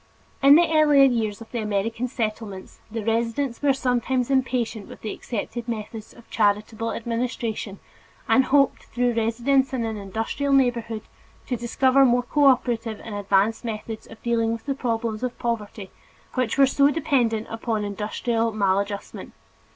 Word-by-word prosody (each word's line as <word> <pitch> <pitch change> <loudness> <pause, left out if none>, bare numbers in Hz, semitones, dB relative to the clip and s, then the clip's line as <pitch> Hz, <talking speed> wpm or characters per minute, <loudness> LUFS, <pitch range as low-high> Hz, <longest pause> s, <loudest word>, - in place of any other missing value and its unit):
In 280 +1 +8
the 340 +1 +5
earlier 300 -3 +6
years 230 -5 +1
of 225 - -12
the 240 - -2
American 215 +3 -1
Settlements, 215 -5 -5
the 220 -1 -5
residents 230 +3 -1
were 285 -1 +4
sometimes 255 0 0
impatient 250 -5 0
with - - -12
the 215 - -4
accepted 235 +1 -5
methods 220 -1 -6
of 235 - -17
charitable 215 +2 0
administration 230 -3 -3 0.5
and 265 - +4
hoped, 275 0 +2
through 245 0 0
residence 245 +4 +1
in 240 -3 -1
an 220 -1 -3
industrial 225 +8 -2
neighborhood, 235 -4 +1 0.4
to 250 - -2
discover 260 +3 +3
more 245 -1 +3
cooperative 245 -5 +2
and 225 - -7
advanced 205 +2 +1
methods 220 -1 -6
of 225 - -13
dealing 230 -1 +1
with 230 0 -5
the 280 - 0
problems 230 -4 -2
of 250 -1 -3
poverty 215 -4 -4 0.4
which 255 -2 -1
are 275 - +7
so 280 +1 +3
dependent 265 -8 +1
upon 225 -1 -2
industrial 225 +3 -1
maladjustment. 200 -1 -2
230 Hz, 150 wpm, -24 LUFS, 220-255 Hz, 0.5 s, In